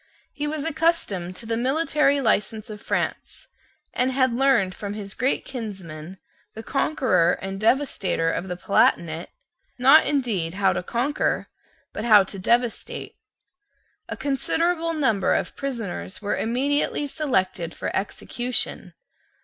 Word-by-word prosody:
He 295 0 -3
was 305 0 -3
accustomed 300 - 0
to 205 - -7
the 225 0 -1
military 285 +3 +2
license 220 -1 0
of 210 - -9
France, - - -3 0.5
and 255 +1 +1
had 260 -2 +2
learned 245 -7 +3
from 205 +1 -6
his 200 -2 -5
great 255 +3 0
kinsman, 190 - -7 0.4
the 220 - -7
conqueror 260 - +2
and 195 0 -5
devastator 215 - +1
of 175 - -3
the 180 -1 -4
Palatinate, 170 -3 +1 0.5
not 270 +5 +7
indeed 215 - 0
how 195 -1 +3
to - - -2
conquer, 245 +10 -1 0.4
but 210 - -4
how 215 -4 +7
to 195 +1 -8
devastate. 235 +4 -1 0.9
A - - -4
considerable 330 +4 0
number 230 -11 +2
of - - -2
prisoners 230 -8 -4
were 205 -1 -1
immediately 280 +5 0
selected 190 - -1
for - - -4
execution. 240 +5 -2
235 Hz, 130 wpm, -24 LUFS, 195-275 Hz, 0.9 s, not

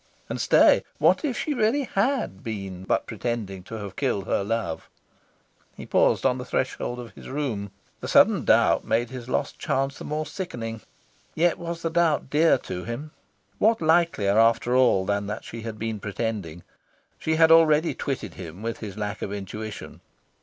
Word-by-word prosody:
And - - -3
stay! - - +5
what - - +3
if 275 -5 -1
she 300 - -1
really 245 +3 +2
HAD 230 - -1
been 95 -4 -6
but - - +1
pretending 110 -6 -4
to 115 - -7
have 100 -3 -7
killed 115 -9 -1
her 100 - 0
love? 110 -6 -3 0.9
He - - -8
paused - - +2
on 130 -1 +2
the - - -4
threshold 125 -1 -2
of 120 -2 -8
his - - -11
room. 130 -8 -3 0.3
The - - -6
sudden - - +5
doubt - - +4
made 120 +1 0
his 125 -1 -8
lost 140 - -2
chance 135 +1 -1
the - - -7
more 155 +1 -3
sickening. 115 - -5 0.5
Yet 170 +1 +2
was 170 -1 -5
the 165 - -1
doubt 160 -5 +1
dear 155 0 +4
to 90 -6 -6
him... 140 +7 -6 0.5
What 225 +1 +4
likelier, 160 - +3
after 115 +2 +3
all, 120 -7 +4
than 100 +1 -1
that 105 - -5
she 115 - -7
had 110 -1 -6
been 110 -1 -3
pretending? 100 -5 -4 0.6
She 160 - 0
had 160 0 +5
already 160 0 +5
twitted 125 - -4
him 85 +6 -9
with 115 0 -3
his 105 -2 -7
lack 105 0 -4
of 100 - -4
intuition. 105 +2 -7
115 Hz, 175 wpm, -25 LUFS, 105-155 Hz, 0.9 s, stay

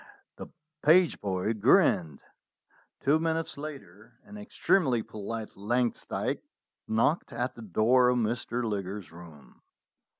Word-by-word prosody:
The - - -8 0.3
page 170 +2 +4
boy 95 +2 -1
grinned. 80 -7 +3 0.8
Two 145 +3 +3
minutes 165 0 -2
later 135 - -10
an 210 - -13
extremely 180 - +1
polite 110 +1 -6
Langsdyke 120 +4 -1 0.5
knocked 115 +9 +1
at 120 +1 -3
the 115 - -12
door 115 +5 +3
of 125 - +2
Mr. 120 +1 -1
Liggers's 100 -3 -4
room. 80 -5 -15
115 Hz, 110 wpm, -28 LUFS, 100-140 Hz, 0.8 s, page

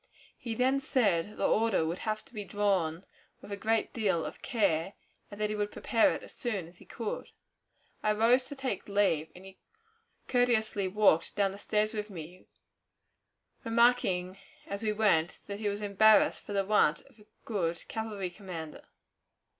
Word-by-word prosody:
He 230 -2 -5
then 260 +3 +2
said 210 -8 +1
the - - +2
order 220 -6 +2
would 170 +3 -3
have 215 0 -3
to 275 - -20
be 210 -2 -5
drawn 190 -4 0 0.3
with - - -12
a - - -1
great 220 +2 0
deal 195 -8 0
of - - -8
care, 190 -5 0 0.4
and 205 - -10
that 210 0 0
he - - -2
would 205 0 -2
prepare 240 +5 +2
it - - -8
as - - -10
soon 205 -9 -3
as 175 +1 -15
he - - -15
could. 225 -3 -5 0.7
I 215 - +2
arose 235 +4 +4
to 285 - -8
take 270 -1 -4
leave, 195 -6 +2
and 180 +2 -13
he 195 0 -14 0.7
courteously 220 -5 +1
walked 190 -4 +3
down 200 -2 +2
the 200 - -10
stairs 215 +1 0
with 210 -1 -4
me, 175 -1 -10 1.2
remarking 225 -6 +2 0.3
as 200 +1 -5
we 215 -1 0
went 195 -6 +2
that 200 0 -6
he 210 -1 0
was 205 +1 -4
embarrassed 210 +2 +4
for 205 - -6
the 195 -1 +1
want 195 -6 +3
of 220 - -23
a 210 - -19 0.2
good 175 -6 -2
cavalry 210 -5 -4
commander. 175 -5 -8
205 Hz, 175 wpm, -30 LUFS, 185-220 Hz, 1.2 s, arose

